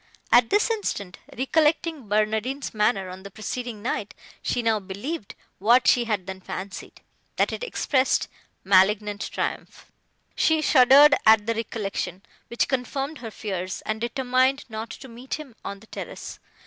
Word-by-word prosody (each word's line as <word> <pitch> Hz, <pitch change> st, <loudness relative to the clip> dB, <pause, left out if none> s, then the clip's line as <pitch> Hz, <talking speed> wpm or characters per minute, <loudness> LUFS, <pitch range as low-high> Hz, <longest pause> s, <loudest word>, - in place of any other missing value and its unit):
At 240 Hz, -1 st, +6 dB
this 420 Hz, +3 st, +2 dB
instant, 205 Hz, -, -3 dB, 0.2 s
recollecting 305 Hz, 0 st, +1 dB
Barnardine's 220 Hz, +6 st, 0 dB
manner, 210 Hz, -3 st, +1 dB
on 185 Hz, +1 st, -9 dB
the 200 Hz, -, -9 dB
preceding 215 Hz, +1 st, -6 dB
night, 210 Hz, -4 st, -3 dB, 0.3 s
she 245 Hz, -, -1 dB
now 225 Hz, -2 st, +2 dB
believed, 205 Hz, -, -6 dB, 0.2 s
what 235 Hz, +6 st, +4 dB
she 240 Hz, -1 st, +4 dB
had 210 Hz, -5 st, -1 dB
then 190 Hz, 0 st, -7 dB
fancied, 190 Hz, +1 st, -7 dB, 0.3 s
that -, -, +1 dB
it -, -, -5 dB
expressed 270 Hz, -, +1 dB, 0.4 s
malignant 205 Hz, +2 st, +3 dB
triumph. -, -, -5 dB, 0.4 s
She 320 Hz, -1 st, +2 dB
shuddered 285 Hz, 0 st, +7 dB
at 220 Hz, -1 st, +7 dB
the 230 Hz, -, +1 dB
recollection, 205 Hz, -4 st, -4 dB, 0.2 s
which 235 Hz, -, 0 dB
confirmed 270 Hz, +3 st, -2 dB
her 230 Hz, -, -6 dB
fears, 190 Hz, -4 st, -5 dB
and 215 Hz, 0 st, -3 dB
determined 255 Hz, +2 st, +1 dB
not 220 Hz, +1 st, -5 dB
to 265 Hz, -, -9 dB
meet 245 Hz, +2 st, -6 dB
him 290 Hz, -7 st, -10 dB
on 200 Hz, 0 st, -6 dB
the -, -, -15 dB
terrace. -, -, -8 dB
230 Hz, 150 wpm, -25 LUFS, 205-265 Hz, 0.4 s, shuddered